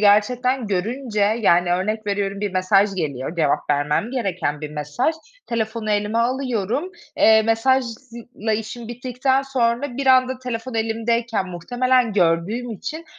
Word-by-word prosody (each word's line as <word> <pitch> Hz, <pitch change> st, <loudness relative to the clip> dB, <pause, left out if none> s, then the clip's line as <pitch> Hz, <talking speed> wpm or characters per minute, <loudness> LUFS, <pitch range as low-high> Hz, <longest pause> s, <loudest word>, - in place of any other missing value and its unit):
gerçekten 240 Hz, +4 st, +3 dB
görünce, 215 Hz, +4 st, -2 dB, 0.2 s
yani 175 Hz, -3 st, +3 dB
örnek 210 Hz, +4 st, -1 dB
veriyorum 200 Hz, 0 st, -1 dB
bir 205 Hz, -2 st, -2 dB
mesaj 195 Hz, +2 st, +3 dB
geliyor, 150 Hz, -2 st, -3 dB
cevap 150 Hz, -2 st, +1 dB
vermem 150 Hz, +10 st, +1 dB
gereken 180 Hz, -, -2 dB
bir 150 Hz, -1 st, -6 dB
mesaj. 150 Hz, -, -1 dB, 0.3 s
Telefonu 220 Hz, -1 st, -2 dB
elime 210 Hz, +2 st, 0 dB
alıyorum. 250 Hz, -, -1 dB, 0.3 s
Eee, 220 Hz, 0 st, +6 dB
mesajla 235 Hz, -1 st, -1 dB
işim 225 Hz, +1 st, -7 dB
bittikten 255 Hz, +2 st, 0 dB
sonra 250 Hz, 0 st, -1 dB
bir 275 Hz, -1 st, -3 dB
anda 255 Hz, 0 st, +4 dB
telefon 250 Hz, -1 st, -5 dB
elimdeyken 225 Hz, -1 st, 0 dB
muhtemelen 245 Hz, +6 st, +1 dB
gördüğüm 195 Hz, +7 st, +1 dB
için 315 Hz, -, -6 dB
225 Hz, 125 wpm, -22 LUFS, 195-250 Hz, 0.3 s, Eee